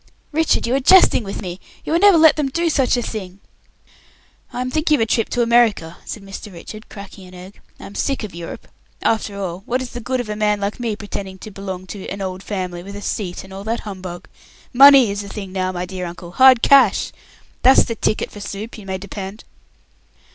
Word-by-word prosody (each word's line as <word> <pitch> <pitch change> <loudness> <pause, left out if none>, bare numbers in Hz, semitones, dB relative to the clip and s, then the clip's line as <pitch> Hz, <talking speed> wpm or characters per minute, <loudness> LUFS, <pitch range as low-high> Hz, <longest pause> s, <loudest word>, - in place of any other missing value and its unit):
"Richard, 320 +1 +1
you 235 - -1
are 270 - +3
jesting 325 -3 +6
with 195 +1 -6
me! 180 0 -6 0.3
You - - -2
will 335 - +3
never 400 -2 +7
let 320 -1 +6
them 295 -3 -1
do 335 +4 0
such 265 -4 +2
a 240 - -1
thing!" 195 -4 -6 1.1
"I'm 255 +1 -3
thinking 310 +1 +2
of 280 - -1
a - - +3
trip 225 0 0
to 240 - +1
America," 230 -8 +2
said 210 - -7
Mr. 195 +2 -9
Richard, 215 +5 -11
cracking 200 -2 -11
an 180 - -14
egg. 185 +2 -12 0.2
"I - - -10
am 200 - -10
sick 275 +3 -2
of 210 - -7
Europe. 170 0 -8 0.4
After 210 -2 0
all, 185 -2 -4
what 250 +2 0
is 255 -1 -6
the 245 - -6
good 255 +2 -2
of 245 - -4
a 210 - -4
man 210 -1 +1
like 200 +3 -3
me 230 -3 -2
pretending 200 -2 -7
to 215 - -10
belong 190 -2 -6
to 190 +1 -8
'an 200 - -5
old 185 -1 -4
family', 185 -4 -4
with 200 +3 -9
'a 205 - -7
seat' 180 -4 -4
and 190 0 -13
all 195 +1 -7
that 230 +2 -2
humbug? 185 -4 -8 0.5
Money 270 -3 +8
is 200 0 -3
the 200 - -9
thing 195 -3 -7
now, 185 -1 -1
my 180 0 -4
dear 180 -1 -5
uncle. 170 0 -9
Hard 255 +2 +6
cash! 260 -8 +5 0.5
That's 260 +1 +6
the 230 - -4
ticket 215 -1 -1
for 205 - -10
soup, 205 +3 -7
you 200 - -12
may 190 0 -2
depend." 195 +2 -8
205 Hz, 225 wpm, -20 LUFS, 190-245 Hz, 1.1 s, Money